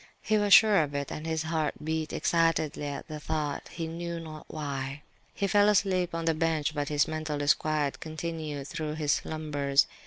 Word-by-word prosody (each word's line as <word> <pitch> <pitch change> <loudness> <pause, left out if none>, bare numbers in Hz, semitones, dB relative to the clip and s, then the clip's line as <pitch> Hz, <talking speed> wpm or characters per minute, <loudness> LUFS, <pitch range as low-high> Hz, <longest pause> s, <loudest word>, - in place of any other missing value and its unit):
He 215 -1 +2
was 205 -1 +1
sure 210 -5 +6
of 145 -2 -3
it, 140 -1 -3
and 155 +1 -5
his 160 -1 -1
heart 160 -2 -1
beat 160 0 -2
excitedly 165 -3 +1
at 140 - -5
the 155 -1 -6
thought, 150 -2 -3
he 165 - -5
knew 170 +1 -4
not 155 -2 -9
why. 140 -2 -4 0.3
He 200 - 0
fell 205 +2 +4
asleep 185 -4 +2
on 165 0 -2
the 165 - +3
bench; 160 -2 0
but 145 -1 -2
his 145 -1 +2
mental 155 -1 -3
disquiet 145 0 +1
continued 155 -3 -5
through 155 -2 -4
his 150 -2 0
slumbers. 145 -3 +1
155 Hz, 185 wpm, -29 LUFS, 150-165 Hz, 0.3 s, sure